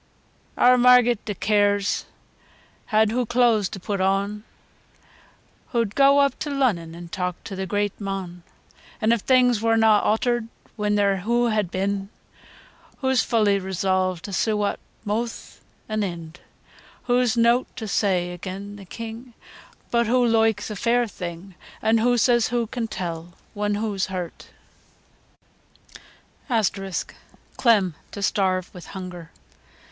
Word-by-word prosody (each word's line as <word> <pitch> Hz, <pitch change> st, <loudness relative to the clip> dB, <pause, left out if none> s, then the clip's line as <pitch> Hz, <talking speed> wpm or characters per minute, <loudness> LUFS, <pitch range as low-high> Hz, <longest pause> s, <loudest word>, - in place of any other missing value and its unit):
VII. -, -, +1 dB
Eawr 250 Hz, 0 st, +6 dB
Marget 245 Hz, -2 st, +5 dB
declares 205 Hz, -1 st, +1 dB, 0.8 s
had 215 Hz, -1 st, +3 dB
hoo 250 Hz, +2 st, +1 dB
cloo'as 235 Hz, -4 st, +3 dB
to 195 Hz, -, -7 dB
put 200 Hz, +1 st, -3 dB
on, 200 Hz, +2 st, 0 dB, 1.3 s
Hoo'd 230 Hz, -4 st, 0 dB
goo 280 Hz, 0 st, +5 dB
up 280 Hz, -1 st, +2 dB
to 300 Hz, -, -3 dB
Lunnon 210 Hz, -, 0 dB
an' 170 Hz, 0 st, -10 dB
talk 180 Hz, 0 st, -2 dB
to 195 Hz, -, -7 dB
th' 190 Hz, -1 st, -4 dB
greet 205 Hz, +1 st, -1 dB
mon; 190 Hz, -3 st, -5 dB, 0.6 s
An' 220 Hz, -, +2 dB
if 235 Hz, -3 st, +2 dB
things 250 Hz, -3 st, +3 dB
were 225 Hz, 0 st, +2 dB
na 220 Hz, -2 st, +5 dB
awtered 235 Hz, +1 st, +1 dB, 0.3 s
when 210 Hz, -1 st, 0 dB
there 200 Hz, -1 st, +2 dB
hoo 235 Hz, +5 st, +1 dB
had 210 Hz, -4 st, 0 dB
been, 195 Hz, +1 st, -2 dB, 0.9 s
Hoo's 265 Hz, -3 st, +2 dB
fully 205 Hz, -2 st, +2 dB
resolved 185 Hz, -1 st, -1 dB
t' 200 Hz, -, -6 dB
sew 210 Hz, +2 st, 0 dB
up 200 Hz, -, -1 dB, 0.3 s
meawth 230 Hz, +3 st, -4 dB, 0.3 s
an' 215 Hz, 0 st, -1 dB
eend; 170 Hz, -3 st, -6 dB, 0.7 s
Hoo's 245 Hz, -1 st, +2 dB
neawt 235 Hz, +2 st, +3 dB
to 225 Hz, -3 st, -6 dB
say 185 Hz, -3 st, +1 dB
again 195 Hz, +3 st, -7 dB
t' 200 Hz, -, -11 dB
king, 230 Hz, +4 st, -8 dB, 0.6 s
But 235 Hz, -1 st, +2 dB
hoo 245 Hz, +1 st, +3 dB
loikes 225 Hz, -1 st, +2 dB
a -, -, -4 dB
fair 240 Hz, +4 st, +2 dB
thing, 180 Hz, -2 st, -8 dB, 0.3 s
An' 225 Hz, +1 st, +2 dB
hoo 245 Hz, +2 st, +3 dB
says 240 Hz, -1 st, +3 dB
hoo 240 Hz, 0 st, 0 dB
can 235 Hz, 0 st, -4 dB
tell 170 Hz, -4 st, -6 dB, 0.2 s
when 205 Hz, -1 st, -1 dB
hoo's 205 Hz, -2 st, -1 dB
hurt. 180 Hz, -3 st, -6 dB, 2.0 s
[Footnote 195 Hz, -6 st, -1 dB
5: -, -, -4 dB, 0.4 s
"Clem," 205 Hz, -8 st, +3 dB, 0.2 s
to 200 Hz, -, -7 dB
starve 185 Hz, -2 st, 0 dB
with 180 Hz, -3 st, -11 dB
hunger. 180 Hz, -3 st, -8 dB
210 Hz, 140 wpm, -23 LUFS, 190-235 Hz, 2.0 s, Eawr